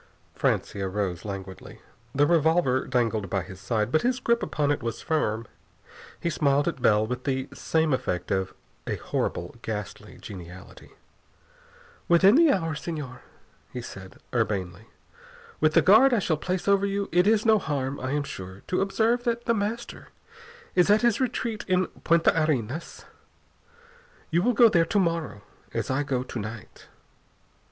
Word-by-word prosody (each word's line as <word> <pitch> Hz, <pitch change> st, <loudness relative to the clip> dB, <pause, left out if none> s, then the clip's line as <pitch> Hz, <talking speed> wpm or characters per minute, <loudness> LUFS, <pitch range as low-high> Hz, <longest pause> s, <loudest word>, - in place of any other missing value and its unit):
Francia 95 Hz, -2 st, -1 dB
rose 95 Hz, -3 st, -3 dB
languidly. 95 Hz, -2 st, -8 dB, 0.4 s
The 145 Hz, +1 st, +4 dB
revolver 160 Hz, -4 st, +2 dB
dangled 115 Hz, -6 st, 0 dB
by 95 Hz, -1 st, -1 dB
his 95 Hz, +1 st, -11 dB
side, 110 Hz, +1 st, -1 dB
but 155 Hz, -, +3 dB
his 250 Hz, +1 st, 0 dB
grip 235 Hz, -1 st, +1 dB
upon 145 Hz, -1 st, 0 dB
it 145 Hz, -, -1 dB
was 115 Hz, -2 st, -4 dB
firm. 115 Hz, -8 st, -1 dB, 0.7 s
He 170 Hz, -, -1 dB
smiled 145 Hz, -2 st, +2 dB
at 135 Hz, -, -3 dB
Bell 105 Hz, -3 st, +4 dB
with 125 Hz, +2 st, -4 dB
the 130 Hz, -1 st, -1 dB
same 160 Hz, -2 st, 0 dB
effect 90 Hz, -8 st, -2 dB
of 95 Hz, -1 st, -1 dB, 0.3 s
a -, -, -1 dB
horrible, 85 Hz, +7 st, -3 dB
ghastly 105 Hz, +1 st, -6 dB
geniality. 90 Hz, -2 st, -11 dB, 1.1 s
"Within 180 Hz, +4 st, +6 dB
the 315 Hz, +2 st, +6 dB
hour, 165 Hz, -, 0 dB
Señor," 150 Hz, -5 st, -6 dB, 0.5 s
he 125 Hz, -, -5 dB
said 95 Hz, -3 st, -10 dB, 0.2 s
urbanely. 100 Hz, -3 st, -2 dB, 0.7 s
"With -, -, +2 dB
the -, -, +6 dB
guard 270 Hz, -2 st, +6 dB
I -, -, +2 dB
shall 175 Hz, -5 st, +1 dB
place 180 Hz, +5 st, -3 dB
over 200 Hz, 0 st, +3 dB
you 200 Hz, 0 st, -2 dB
it 180 Hz, +3 st, +3 dB
is 215 Hz, 0 st, +3 dB
no 220 Hz, -1 st, +5 dB
harm, 140 Hz, -5 st, -3 dB
I 130 Hz, -, -4 dB
am 145 Hz, +1 st, 0 dB
sure, 95 Hz, -7 st, -9 dB
to 185 Hz, -, +1 dB
observe 225 Hz, +5 st, +1 dB
that 235 Hz, 0 st, -1 dB
The 235 Hz, -, +2 dB
Master 220 Hz, +2 st, -4 dB, 0.7 s
is 180 Hz, +2 st, +3 dB
at 210 Hz, +3 st, +4 dB
his 240 Hz, +1 st, +2 dB
retreat 235 Hz, -4 st, -2 dB
in 185 Hz, 0 st, +2 dB, 0.2 s
Punta 170 Hz, 0 st, +4 dB
Arenas. 145 Hz, 0 st, -3 dB, 1.3 s
You 170 Hz, +2 st, +3 dB
will 245 Hz, +6 st, +2 dB
go 235 Hz, +1 st, +7 dB
there 170 Hz, -6 st, +3 dB
to 205 Hz, -, +1 dB
morrow, 165 Hz, -, -1 dB, 0.3 s
as -, -, -1 dB
I 130 Hz, +2 st, +1 dB
go 130 Hz, -3 st, -1 dB
to 130 Hz, -, -6 dB
night." 110 Hz, 0 st, -9 dB
145 Hz, 160 wpm, -26 LUFS, -, 1.3 s, go